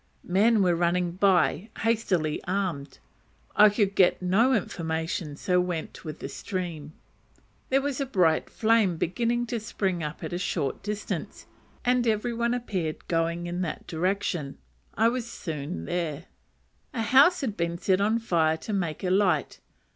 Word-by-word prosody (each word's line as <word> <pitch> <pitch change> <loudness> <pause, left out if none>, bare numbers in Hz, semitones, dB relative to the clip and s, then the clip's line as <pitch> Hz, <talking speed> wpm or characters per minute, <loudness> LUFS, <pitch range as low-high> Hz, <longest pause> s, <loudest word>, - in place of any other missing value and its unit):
Men 205 +4 +3
were 180 -2 +3
running 175 +1 +1
by, 190 +2 +2
hastily 190 -9 0
armed. 175 -8 -2 0.6
I 210 +1 +8
could 205 -1 +1
get 185 -2 +4
no 195 +8 +3
information, 165 - -2
so 180 +4 +1
went 175 -3 -4
with 155 -2 -6
the - - -6
stream. 155 +1 -5 0.8
There 270 +1 +2
was 285 -1 -2
a 275 - -1
bright 180 -10 +2
flame 220 -6 +2
beginning 235 +8 0
to 235 0 -3
spring 195 -5 -2
up 150 -1 -5
at - - -4
a 175 - -2
short 155 -7 -2
distance, 210 0 -5 0.4
and 245 -1 +2
every 225 +2 0
one 235 +1 0
appeared 185 -10 -3
going 170 +1 0
in 175 +1 -3
that 170 -4 -4
direction: 175 -4 -2 0.4
I 225 - +4
was 240 0 -1
soon 140 - -5
there. 165 -2 -3 0.7
A 225 - 0
house 275 - +5
had 230 -7 -2
been 170 -1 -2
set 185 +2 +1
on 215 +3 +2
fire 165 -8 +1
to 210 +6 -6
make 175 -5 -2
a 180 - 0
light. 195 0 +1
185 Hz, 155 wpm, -27 LUFS, 165-225 Hz, 0.8 s, I